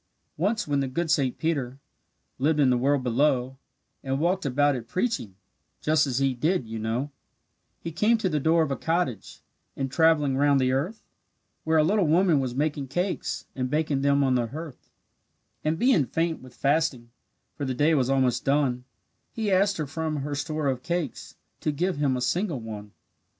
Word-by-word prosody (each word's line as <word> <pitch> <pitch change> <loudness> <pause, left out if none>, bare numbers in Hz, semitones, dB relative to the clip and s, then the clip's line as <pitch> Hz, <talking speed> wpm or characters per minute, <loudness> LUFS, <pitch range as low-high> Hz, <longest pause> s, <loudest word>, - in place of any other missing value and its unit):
Once, 210 +5 0
when 145 -1 +1
the 135 - 0
good 160 +5 -2
Saint 135 -6 +1
Peter 135 -6 -2 0.6
Lived 150 +3 +2
in 135 -3 +4
the 125 - +3
world 140 +1 +2
below, 130 +1 +1 0.4
And 135 0 -1
walked 175 0 0
about 145 +2 +2
it, 115 -2 -6
preaching, 180 - -2 0.4
Just 155 -1 +2
as 125 -2 -1
he 135 -1 +2
did, 135 +1 0
you 110 0 -5
know, 115 +6 -2 0.7
He 165 - -6
came 215 +8 +3
to 220 - -1
the 155 -4 0
door 160 +3 +3
of 150 - -3
a - - 0
cottage, 160 - -2 0.3
In 135 -1 -2
travelling 150 -2 +3
round 140 0 +4
the 130 -1 +2
earth, 160 - -2 0.6
Where 160 0 +3
a 155 - +5
little 195 +2 +2
woman 165 -1 +4
was 130 -2 -3
making 145 -1 -1
cakes 180 +8 -2
And 130 -1 -2
baking 150 -1 0
them 140 0 +3
on 130 -1 +2
the 120 -2 +1
hearth; 155 +2 -9 0.7
And 155 +1 0
being 210 - +3
faint 165 0 -1
with 130 -1 -14
fasting, 140 -5 0 0.4
For 145 - -6
the 130 -2 -2
day 150 +5 +3
was 130 -4 +2
almost 130 -3 +2
done, 135 -3 +1 0.5
He 220 -3 -2
asked 195 +1 +3
her 155 - -2
from 155 +2 -3
her 145 0 -3
store 150 +1 -2
of 130 -2 -1
cakes 170 -2 -4 0.2
To 155 - -1
give 175 +3 -1
him 140 -3 +1
a - - -4
single 160 +4 0
one. 105 -2 -8
145 Hz, 185 wpm, -26 LUFS, 130-165 Hz, 0.7 s, a